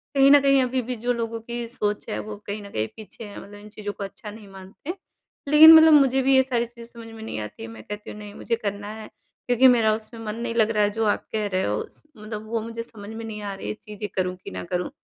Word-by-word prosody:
कहीं 275 0 +6
न 290 - +9
कहीं 275 -1 +4
अभी 255 0 -1
भी - - -1
जो 245 - +3
लोगों 230 -1 -3
की 235 +1 -5
सोच 210 -3 -3
है - - -2
वो 210 - -5
कहीं 205 +1 -4
न 200 - -10
कहीं 110 +1 -1
पीछे 220 +1 -11
है 205 -1 -9
मतलब 205 0 -12
इन 210 - -13
चीज़ों 205 -1 -6
को 200 - -7
अच्छा 205 +2 -8
नहीं 210 -1 -12
मानते, 195 - -8 0.5
लेकिन 310 +2 +10
मतलब 320 -1 +9
मुझे 270 -2 +5
भी 270 +1 +4
ये 265 - +6
सारी 240 -2 0
चीज़ें 235 0 -14
समझ 230 -1 -10
में 220 0 -9
नहीं 220 - -5
आती 105 +1 -8
हैं 115 - -7
मैं 110 -1 -11
कहती 210 0 -8
हूँ - - -10
नहीं 205 -1 -9
मुझे 230 +2 -2
करना 205 -2 -4
है, 220 -1 -9 0.4
क्योंकि 245 +2 +5
मेरा 225 -3 +4
उसमें 225 +1 -9
मन 210 0 -3
नहीं 230 0 -4
लग 225 -1 +3
रहा 210 -2 +2
है 205 - +3
जो 220 - +2
आप 205 - 0
कह 215 -1 0
रहे 185 - +1
हो 105 +1 0
उस - - -11
मतलब 215 0 -7
वो 230 -1 -1
मुझे 230 +1 -6
समझ 210 -3 -11
में 225 0 -7
नहीं 210 -1 -6
आ 200 -1 -4
रही - - -9
हैं - - -1
ये - - -14
चीज़ें 210 -1 -7
करूँ 185 -1 -1
कि - - -6
ना 90 0 -5
करूँ? 180 - -3
220 Hz, 285 wpm, -24 LUFS, 205-240 Hz, 0.5 s, लेकिन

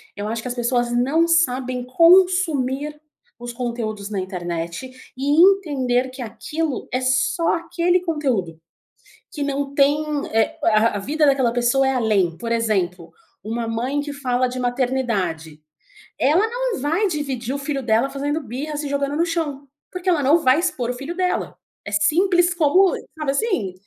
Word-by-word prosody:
Eu 205 +1 -4
acho 225 +1 -3
que 250 - -7
as - - -2
pessoas 240 0 0
não 275 +8 +2
sabem 255 -6 +1
consumir 300 -3 +3 0.4
os 240 0 -7
conteúdos 230 -4 -4
na 205 -2 -3
internet 175 +3 -5 0.3
e 285 +4 +3
entender 280 -10 +3
que 260 0 -9
aquilo 300 +5 -4
é 255 - +1
só 260 +6 +1
aquele 340 +1 0
conteúdo, 260 - -2 0.7
que 295 - -6
não 280 0 -2
tem, 280 +1 +4 0.4
eh, 225 0 +1
a 220 0 +3
a - - -3
vida 300 +9 0
daquela 270 -4 +3
pessoa 245 +3 +2
é - - +2
além. 205 -9 +1
Por 230 -1 -5
exemplo, 185 -7 -1 0.3
uma 230 +2 -3
mãe 245 +6 -2
que 290 0 -6
fala 255 -3 0
de 250 +1 -5
maternidade. 230 - -2 0.6
Ela 330 +11 +3
não - - -2
vai 330 +9 +1
dividir 275 - -3
o - - -1
filho 280 -1 -3
dela 235 +3 +2
fazendo 290 +3 -2
birra 280 +5 -5
se 290 -1 -4
jogando 280 0 -1
no 335 - +2
chão, 305 -5 -3 0.2
porque 365 0 -3
ela 335 -5 +2
não 285 +5 +5
vai 260 +4 +4
expor 265 -9 -1
o - - -4
filho 275 +7 -6
dela. 365 0 -2 0.3
É 205 - -6
simples 350 - +3
como 360 +3 +4 0.2
sabe 305 -3 -1
assim? 280 - -1
265 Hz, 165 wpm, -21 LUFS, 235-310 Hz, 0.7 s, não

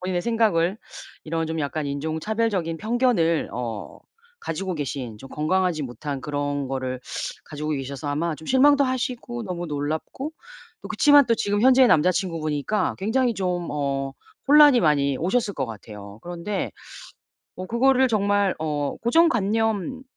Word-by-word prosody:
본인의 180 -1 -2
생각을 215 -5 +1 0.5
이런 165 0 -2
좀 160 0 -3
약간 145 +1 -2
인종차별적인 165 +5 -1
편견을 220 -9 +1
어 115 -3 -5 0.4
가지고 185 +3 -3
계신 130 -6 -5
좀 135 - -11
건강하지 170 +1 0
못한 135 +2 -5
그런 145 0 -2
거를 130 -1 -3 0.4
가지고 150 0 -5
계셔서 140 0 -4
아마 155 +3 -1
좀 160 - -13
실망도 280 +2 +5
하시고 245 -2 -3
너무 175 -2 -4
놀랍고 155 - -4 0.5
또 - - -8
그치만 290 -3 +5
또 230 - +3
지금 205 -1 0
현재의 260 0 +6
남자친구분이니까 165 +1 +1
굉장히 235 +4 +1
좀 180 -3 -2
어 135 -2 -2 0.4
혼란이 290 -2 +8
많이 140 -3 +2
오셨을 205 +4 0
것 135 - -2
같아요. 105 -2 -10
그런데 175 +3 -4 0.9
뭐 185 - -6
그거를 260 +3 +3
정말 205 -2 +2
어 150 -2 -2
고정관념인 230 - +1
175 Hz, 320 characters per minute, -24 LUFS, 145-225 Hz, 0.9 s, 혼란이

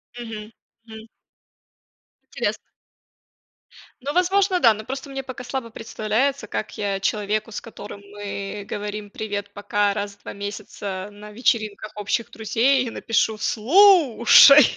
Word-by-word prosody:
Мгм, 225 -3 -7 0.3
мгм. 220 -1 -11 1.2
Интересно. - - -2 1.4
Ну, 280 +3 -3
возможно, 370 +1 +2
да. 230 -8 +6
Но 215 +1 -8
просто 265 +3 -6
мне 270 0 -5
пока 260 -1 -8
слабо 245 -1 -4
представляется, 225 +3 -1
как 215 - -5
я 200 -1 -1
человеку, 210 +2 -1
с - - -5
которым 205 -3 -10
мы 205 0 -6
говорим: 210 0 -5
"Привет-пока", 205 0 -2
раз 205 0 -4
в 205 - -33
2 - - -7
месяца 200 -1 -6
на 210 +1 -12
вечеринках 215 -2 -1
общих 210 +3 -2
друзей, 240 +4 +1
напишу: 225 -2 0
"Слушай" 290 - +7
220 Hz, 120 wpm, -23 LUFS, 205-255 Hz, 1.4 s, Слушай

